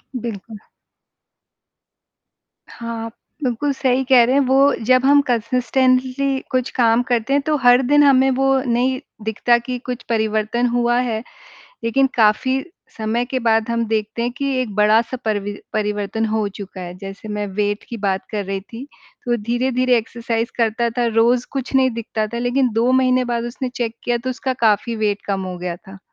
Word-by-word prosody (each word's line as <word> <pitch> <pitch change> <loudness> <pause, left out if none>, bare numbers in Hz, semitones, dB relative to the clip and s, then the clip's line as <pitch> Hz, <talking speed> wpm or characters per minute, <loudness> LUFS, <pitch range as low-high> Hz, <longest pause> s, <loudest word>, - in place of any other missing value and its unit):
बिल्कुल। 225 -2 -6 2.1
हाँ, 230 -1 -6
आप 230 - -8 0.3
बिल्कुल 255 +3 0
सही 265 -1 +1
कह 255 -3 +7
रहे 250 +3 +2
हैं 280 - +4
वो 270 +2 +4 0.2
जब 255 0 +5
हम 285 +1 +6
कंसिस्टेंटली 255 +3 +1
कुछ 255 -1 0
काम 230 -1 +3
करते 240 +2 0
हैं। 285 - +3
तो 310 - +1
हर 245 +1 +6
दिन 290 +1 +5
हमें 270 -1 +5
वो 270 +1 +1 0.2
नहीं 250 +2 +1 0.3
दिखता 230 +2 +2
कि 250 +1 -4
कुछ 250 -1 -5
परिवर्तन 220 +1 0
हुआ 240 0 +2
है 230 -3 -2 0.6
लेकिन 270 +4 +3
काफ़ी 245 +4 +2 0.3
समय 225 +2 -1
के 260 +1 -2
बाद 225 -1 +2
हम 235 0 0
देखते 220 +1 -2
हैं 240 - 0
कि 280 - -2
एक 215 -6 -4
बड़ा-सा 220 +4 +3
परिवि 205 -2 -1 0.2
परिवर्तन 210 +1 -1
हो 215 -1 0
चुका 195 -1 -9
है। 175 -1 -7
जैसे 195 +2 -9
मैं 210 0 -3
वेट 205 +1 -2
की 235 - -5
बात 195 -3 -2
कर 210 -2 -3
रही 195 0 -3
थी, 230 +5 -10 0.4
तो 240 -1 +1
धीरे-धीरे 250 +2 +1
एक्सरसाइज 230 +1 -3
करता 230 0 +1
था, 240 - +2
रोज़ 235 +2 +2
कुछ 270 -1 -4
नहीं 260 -1 +4
दिखता 225 -2 -3
था। 235 +2 -5
लेकिन 245 +1 +1
2 230 +3 +2
महीने 255 -1 +3
बाद 235 -1 -2
उसने 250 +2 -4
चेक 235 -2 -2
किया 240 - +1
तो 255 +2 -4
उसका 260 +1 -2
काफ़ी 220 +2 +1
वेट 210 -2 -1
कम 195 -1 -1
हो - - -7
गया 175 -1 -4
था। 195 +1 -14
235 Hz, 175 wpm, -20 LUFS, 215-255 Hz, 2.1 s, कह